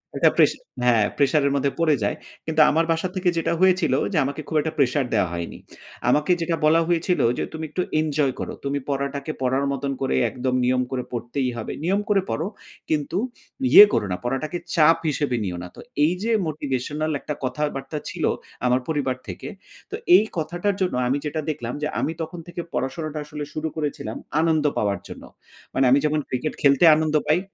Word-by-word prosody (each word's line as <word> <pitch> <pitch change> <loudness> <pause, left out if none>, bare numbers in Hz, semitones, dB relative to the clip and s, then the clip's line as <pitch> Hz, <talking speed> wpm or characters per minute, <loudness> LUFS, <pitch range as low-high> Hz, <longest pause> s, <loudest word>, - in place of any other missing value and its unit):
ওটা - - +5
প্রেসা - - +4 0.3
হ্যাঁ 115 -4 +4
প্রেশার 145 +1 +3
এর - - +1
মধ্যে 140 0 +1
পড়ে 155 -3 +4
যায়। 100 - 0 0.3
কিন্তু 160 -1 +2
আমার 160 +2 +2
বাসা 165 +3 0
থেকে 185 -1 +2
যেটা 165 0 +1
হয়েছিল 185 -6 +4 0.2
যে - - +1
আমাকে 140 +3 -4
খুব 160 - -4
একটা 160 +1 -3
প্রেশার 140 0 +2
দেয়া 100 -4 +2
হয়নি। 85 -1 -5 0.5
আমাকে 150 +4 +3
যেটা 165 0 0
বলা 160 +2 +5
হয়েছিল 175 +1 +1 0.2
যে - - -1
তুমি 160 0 -5
একটু 180 +5 -2 0.2
এনজয় 150 -3 +1
করো। - - -4
তুমি 140 +1 -1
পড়াটাকে 140 +2 -2
পড়ার 130 +2 +1
মতন 140 0 -2
করে 135 - 0
একদম 125 0 -2
নিয়ম 125 0 +2
করে 125 -1 -2
পড়তেই 125 +2 -2
হবে। 110 - -4
নিয়ম 195 +4 +2
করে 200 -2 +4
পড়ো, 160 - -1 0.4
কিন্তু 155 +3 -1 0.5
ইয়ে - - +12
করো - - +1
না 90 - -1
পড়াটাকে 135 +7 -2 0.2
চাপ 165 0 +6
হিসেবে 140 -3 0
নিও 90 -3 -3
না। - - -6
তো - - -13 0.2
এই 160 +4 +4
যে 230 - 0 0.2
মোটিভেশনাল 150 +1 -2
একটা 150 - -4
কথাবার্তা 140 +1 -3
ছিল 175 -4 -5 0.4
আমার 125 +1 +3
পরিবার 145 -5 0
থেকে। - - -7 0.4
তো - - -2 0.2
এই - - +7
কথাটার 175 +5 -1
জন্য 185 - +1
আমি 135 +3 +1
যেটা 155 +1 -2
দেখলাম 120 -5 -3
যে - - +1
আমি - - 0
তখন 170 +2 -5
থেকে 175 0 -5
পড়াশোনাটা 150 +5 -3
আসলে 150 0 -6
শুরু 155 +1 -2
করেছিলাম 145 -8 -3 0.2
আনন্দ 160 -2 +2
পাওয়ার 100 -2 0
জন্য। - - -10 0.5
মানে 135 - +2
আমি 140 - +6
যখন 150 0 +1
ক্রিকেট 130 +4 -2
খেলতে 140 +2 +5
আনন্দ 155 0 0
পাই 155 +3 +4
150 Hz, 190 wpm, -23 LUFS, 130-160 Hz, 0.5 s, ইয়ে